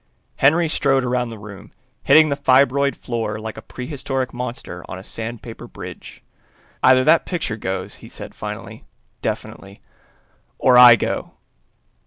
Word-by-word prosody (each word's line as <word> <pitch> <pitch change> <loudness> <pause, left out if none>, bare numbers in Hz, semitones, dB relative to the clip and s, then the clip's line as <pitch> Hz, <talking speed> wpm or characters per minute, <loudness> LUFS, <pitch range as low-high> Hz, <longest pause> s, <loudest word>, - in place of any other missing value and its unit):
Henry 160 +5 +4
strode 135 -3 +1
around 125 -1 -1
the 115 - -8
room, 105 -1 -11 0.3
hitting 155 0 +6
the 140 - 0
fibroid 140 0 +3
floor 115 -3 -4
like 110 0 -6
a - - -9
prehistoric 130 0 -4
monster 120 -8 -6
on 95 - -6
a 95 - -10
sandpaper 115 +1 -7
bridge. - - -11 0.6
"Either 130 0 +5
that 165 - +4
picture 165 -11 -2
goes," 95 -3 -5
he - - -13
said - - -9
finally, - - -8 0.4
definitely, 100 +1 -5 0.8
"or 125 - +4
I 125 -1 +10
go!" - - -3
125 Hz, 140 wpm, -21 LUFS, 110-135 Hz, 0.8 s, I